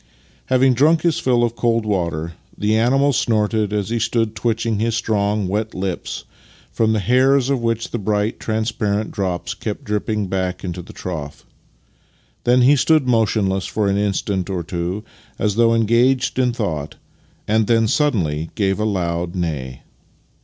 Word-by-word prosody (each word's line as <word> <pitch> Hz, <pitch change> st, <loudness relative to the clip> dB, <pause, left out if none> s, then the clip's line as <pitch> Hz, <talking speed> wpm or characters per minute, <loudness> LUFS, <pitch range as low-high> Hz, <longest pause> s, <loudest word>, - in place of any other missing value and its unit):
Having 130 Hz, 0 st, +4 dB
drunk 155 Hz, +6 st, +3 dB
his 170 Hz, -3 st, +2 dB
fill 120 Hz, -2 st, +2 dB
of 120 Hz, -1 st, 0 dB
cold 115 Hz, -2 st, +1 dB
water, 85 Hz, -5 st, -2 dB, 0.2 s
the 105 Hz, +1 st, +1 dB
animal 135 Hz, +5 st, +3 dB
snorted 110 Hz, -3 st, +1 dB
as 105 Hz, -1 st, -1 dB
he 120 Hz, -, 0 dB
stood 115 Hz, -1 st, 0 dB
twitching 115 Hz, -1 st, -1 dB
his 115 Hz, 0 st, 0 dB
strong, 105 Hz, -3 st, 0 dB
wet 105 Hz, +3 st, -2 dB
lips, 85 Hz, -11 st, -4 dB, 0.5 s
from 110 Hz, -1 st, +1 dB
the 110 Hz, -, +1 dB
hairs 130 Hz, +4 st, +3 dB
of 135 Hz, -3 st, 0 dB
which 115 Hz, -1 st, -1 dB
the 120 Hz, -, -2 dB
bright, 105 Hz, +1 st, -1 dB
transparent 110 Hz, -1 st, -1 dB
drops 95 Hz, -4 st, -2 dB
kept 105 Hz, -2 st, -5 dB
dripping 105 Hz, 0 st, -1 dB
back 95 Hz, -1 st, -2 dB
into 90 Hz, -1 st, -4 dB
the 90 Hz, -, -12 dB
trough. 75 Hz, -5 st, -6 dB, 1.0 s
Then 125 Hz, +1 st, +4 dB
he 140 Hz, +4 st, +6 dB
stood 150 Hz, 0 st, +3 dB
motionless 105 Hz, -5 st, +1 dB
for 105 Hz, -2 st, -1 dB
an 100 Hz, 0 st, +1 dB
instant 100 Hz, -1 st, -1 dB
or 90 Hz, -3 st, -2 dB
two, 90 Hz, +4 st, -3 dB, 0.3 s
as 105 Hz, -1 st, 0 dB
though 115 Hz, +1 st, +3 dB
engaged 120 Hz, +4 st, +2 dB
in 125 Hz, -1 st, +3 dB
thought, 80 Hz, -11 st, -3 dB, 0.5 s
and 110 Hz, 0 st, +2 dB
then 115 Hz, -1 st, +3 dB
suddenly 85 Hz, -, 0 dB
gave 100 Hz, -2 st, 0 dB
a 105 Hz, -, 0 dB
loud 85 Hz, -3 st, -2 dB
neigh. 70 Hz, -8 st, -4 dB
105 Hz, 160 wpm, -20 LUFS, 95-115 Hz, 1.0 s, he